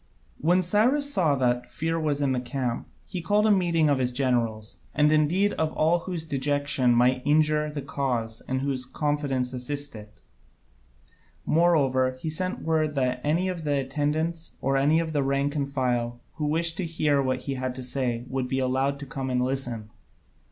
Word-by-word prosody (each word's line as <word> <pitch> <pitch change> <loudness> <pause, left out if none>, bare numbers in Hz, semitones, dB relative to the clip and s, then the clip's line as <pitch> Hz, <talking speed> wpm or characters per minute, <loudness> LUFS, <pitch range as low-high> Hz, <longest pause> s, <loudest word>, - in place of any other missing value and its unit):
When 180 +4 +3
Cyrus 255 +10 +2
saw 160 - +3
that 125 -2 0
fear 165 +1 -2
was 150 -2 0
in 140 -2 +2
the 130 - +1
camp, 125 -1 -3 0.2
he 180 -2 -5
called 205 +5 +2
a 215 - +5
meeting 170 -5 +3
of 140 -2 +2
his 125 -1 +1
generals, 120 -4 -1 0.2
and 150 0 +4
indeed 165 +7 +3
of 160 -1 -1
all 165 +3 +2
whose 170 -2 -4
dejection 145 -3 +1
might 125 +2 +3
injure 150 0 +3
the 150 -2 -5
cause 120 -5 -2
and 130 0 -1
whose 135 -2 -1
confidence 135 -2 -1
assist 140 +2 -4
it. 105 -1 -12 1.3
Moreover, 135 -6 +2
he 155 +3 -3
sent 185 +4 -3
word 155 -2 0
that 125 -2 0
any 165 +5 +1
of 180 -3 -3
the 145 -2 +1
attendants, 155 +5 -2
or 135 +1 0
any 145 +4 +3
of 160 -1 -2
the 145 - +2
rank 140 +2 0
and 140 -2 -1
file, 120 -3 -1 0.2
who 150 - -1
wished 165 +2 0
to 185 - -1
hear 155 -3 +1
what 130 -1 -1
he 140 - -3
had 130 -1 -3
to 130 - -6
say, 125 -2 -2
would 130 -1 -2
be 130 - -1
allowed 135 +2 +1
to - - -5
come 135 -1 -4
and 125 0 +1
listen. 125 -5 -3
140 Hz, 185 wpm, -26 LUFS, 130-160 Hz, 1.3 s, a